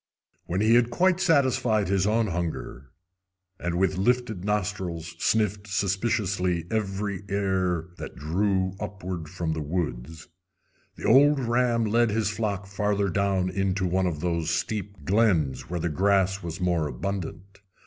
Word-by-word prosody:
When 90 +3 -1
he 110 +2 +4
had 120 0 +4
quite 185 +8 +2
satisfied 130 - +2
his 95 +1 +1
own 110 +2 +2
hunger, 80 - -4 0.7
and 85 0 -2
with 95 0 +1
lifted 115 -3 0
nostrils 95 -5 -2
sniffed 105 -2 +1
suspiciously 95 -3 0
every 100 -2 -2
air 95 -4 0
that - - -7
drew 95 +5 0
upward 95 -5 -5
from 85 -2 -2
the 80 - -3
woods, 80 -1 -4 0.7
the - - -8
old 145 +1 +6
ram 120 -1 +1
led 115 +2 +3
his 105 -1 0
flock 105 -3 -2
further 100 0 0
down 95 -1 +1
into 95 0 0
one 90 +1 +1
of 75 -4 -3
those 85 -2 -1
steep 100 0 -3
glens 90 - +2
where 90 0 -2
the 85 - -1
grass 95 +3 +2
was 85 -2 -6
more 85 -4 +1
abundant. 100 +3 -5
95 Hz, 140 wpm, -26 LUFS, 85-105 Hz, 0.7 s, old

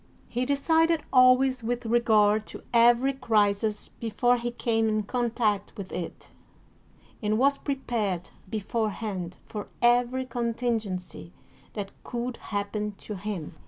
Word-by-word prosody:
He 250 +1 -2
decided 320 +3 +2
always 255 0 +5
with 240 +1 -2
regard 220 -2 +3
to - - -10
every 240 +3 +5
crisis 210 -4 +1
before 245 +2 +1
he 240 0 -2
came 225 -2 0
in 215 0 0
contact 225 -3 -1
with 195 -3 -7
it, 175 - -6 0.9
and 215 0 +1
was 275 +3 +3
prepared 225 - -2 0.2
beforehand 210 -4 -3
for 210 -2 -6
every 245 +2 +3
contingency 220 - -3 0.4
that 200 -2 -5
could 240 0 -4
happen 210 0 -3
to 210 - -8
him. 195 -4 -5
230 Hz, 120 wpm, -27 LUFS, 210-245 Hz, 0.9 s, always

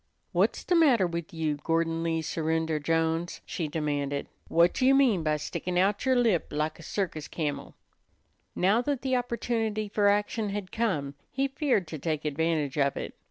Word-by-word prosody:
"Whut's - - +2
the - - 0
matter 280 - +5
with 170 -1 -4
you, 155 -3 -1
Gordon 165 +1 0
Lee 165 -1 -1
Surrender 160 -1 -1
Jones?" 165 +2 0
she 165 - -3
demanded. 145 -2 -2 0.2
"Whut 170 +6 +3
you 265 +1 +6
mean 250 -10 +4
by 155 -1 +1
stickin' 175 +4 -3
out 195 +3 +2
yer 260 - +4
lip 230 -9 +2
lak 155 +1 -2
a - - -10
circus 160 -4 -3
camel?" 150 -4 -4 0.8
Now 200 +6 +3
that 275 0 -2
the 260 -1 +1
opportunity 230 -3 -1
for 205 0 +2
action 205 +1 +1
had 195 -2 -4
come, 155 -12 -1 0.2
he 275 +1 0
feared 270 - 0
to 155 - -6
take 155 0 -2
advantage 150 -1 0
of 140 -1 +2
it. - - -5
170 Hz, 170 wpm, -28 LUFS, 155-220 Hz, 0.8 s, you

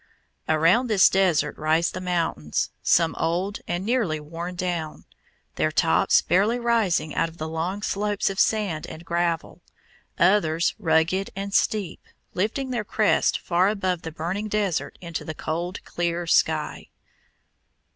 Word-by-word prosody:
Around 165 +11 +3
this 210 -4 +5
desert 175 -6 +2
rise 160 +2 +2
the 185 - -6
mountains, 165 - -1
some 165 -1 +3
old 180 +5 -1
and 175 +2 -2
nearly 220 -10 0
worn 165 +4 -6
down, 175 -3 -4 0.5
their - - +1
tops - - +3
barely 205 +7 +2
rising 225 -10 +1
out 165 - 0
of 165 - -16
the 155 - -4
long 170 +6 -3
slopes 205 0 -1
of 195 - -5
sand 200 -8 +1
and 165 +2 -10
gravel; 170 -1 -2 0.6
others 170 -3 +3
rugged 165 +2 +1
and 195 +1 -5
steep, 205 -4 0 0.3
lifting 235 +8 -2
their 235 -4 -1
crests 215 0 +2
far 180 +1 +1
above 185 -4 -1
the 160 - -6
burning 175 +7 -3
desert 205 -5 -1
into 170 -2 -5
the 160 - -6
cold, 175 +5 -4
clear 175 0 -2
sky. 165 - +1
175 Hz, 140 wpm, -24 LUFS, 165-200 Hz, 0.6 s, this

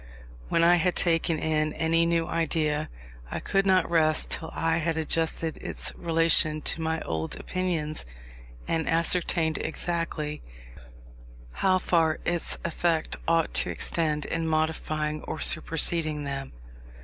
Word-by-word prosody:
When 165 - +2
I 175 +1 +6
had 180 +1 +1
taken 165 -1 +1
in 155 0 0
any 165 +1 +1
new 170 -1 0
idea, 155 -2 -1 0.4
I - - -4
could 195 0 0
not 185 -2 +3
rest 155 -2 +2
till 160 - -1
I 165 0 +1
had 165 -1 -1
adjusted 160 0 0
its - - -4
relation 165 -2 +5
to 165 - +2
my 160 0 -2
old 80 0 -4
opinions, 170 -5 -3 0.6
and 165 -1 -1
ascertained 165 -1 +1
exactly 160 -3 -3 1.1
how 185 - +2
far 165 -3 +1
its 175 -1 0
effect 170 -1 -1
ought 165 -1 +1
to - - 0
extend 155 -3 -2
in 165 0 -2
modifying 155 -1 -1
or - - -5
superseding 155 -2 0
them. 135 -1 -5
160 Hz, 130 wpm, -26 LUFS, 155-170 Hz, 1.1 s, I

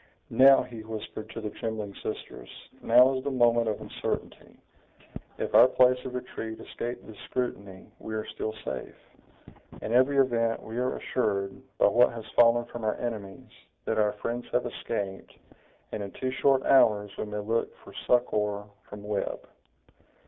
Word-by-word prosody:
"Now," 135 +1 +7
he 115 -2 -9
whispered 110 0 -7
to 115 - -7
the 105 -1 -4
trembling 110 -3 -4
sisters, - - -6 0.3
"now 130 +2 +6
is 130 0 -3
the 140 - -1
moment 120 -3 +3
of 110 - -1
uncertainty! - - -5 0.8
if - - -3
our - - +9
place 125 0 +4
of 125 - -5
retreat 110 -3 -6
escape 120 +1 -6
this 110 - -11
scrutiny, 100 -6 -4
we 110 - -6
are 110 - -3
still 110 0 -5
safe! - - -5 0.8
In 110 - -4
every 130 +3 +4
event, 115 -4 +2
we 115 +2 -5
are 125 +1 0
assured, 100 -5 -1 0.2
by - - +4
what 125 +1 +5
has 115 -2 -7
fallen 120 0 +5
from 120 -1 -8
our 110 - +1
enemies, 110 -5 -6 0.3
that 110 - 0
our 105 -1 +2
friends 120 +3 -4
have 125 0 +1
escaped, 100 -5 -5 0.5
and 105 - -4
in 100 - -5
two 130 0 -3
short 135 0 +3
hours 105 -6 +4
we - - -4
may 105 0 -5
look 110 +3 -1
for - - -13
succor 105 -4 +1 0.3
from 105 0 -9
Webb." 105 -1 -3
115 Hz, 165 wpm, -28 LUFS, 105-125 Hz, 0.8 s, our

